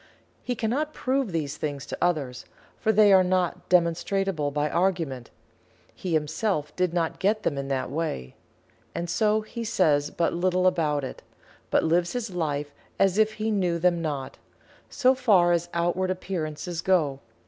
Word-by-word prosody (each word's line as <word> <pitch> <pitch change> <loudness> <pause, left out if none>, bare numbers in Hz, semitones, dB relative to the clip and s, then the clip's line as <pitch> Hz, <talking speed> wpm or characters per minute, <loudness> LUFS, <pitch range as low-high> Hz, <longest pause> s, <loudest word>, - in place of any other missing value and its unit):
He 250 - -3
cannot 270 +8 -1
prove 260 -4 0
these 150 -3 -2
things 145 -2 -4
to - - -6
others, 145 -8 -1 0.3
for 220 - +2
they 210 -1 +6
are 190 -1 +7
not 180 -1 -1
demonstrable 175 -1 +1
by 145 +1 0
argument 165 -9 -1 0.6
he 180 -3 -4
himself 155 +1 -1
did 180 -2 +1
not 165 -2 -1
get 210 +2 +1
them 145 - 0
in 140 0 -4
that 135 -2 -2
way. 140 - -3 0.6
And 170 - -2
so 215 +4 +2
he 230 +2 -6
says 150 -9 +2
but 170 - 0
little 185 +1 +1
about 150 -5 +2
it 130 - -6 0.5
but - - +3
lives 170 +2 +1
his 240 -4 -3
life 150 -4 -2 0.3
as 195 +1 +3
if 215 0 +3
he 215 +1 -2
knew 180 -5 +1
them 175 0 +2
not, 145 -5 -4 0.5
so 260 -2 +3
far 205 -10 +4
as 170 0 0
outward 175 +2 0
appearances 175 -2 -3
go. 155 -8 +1
175 Hz, 160 wpm, -26 LUFS, 150-195 Hz, 0.6 s, are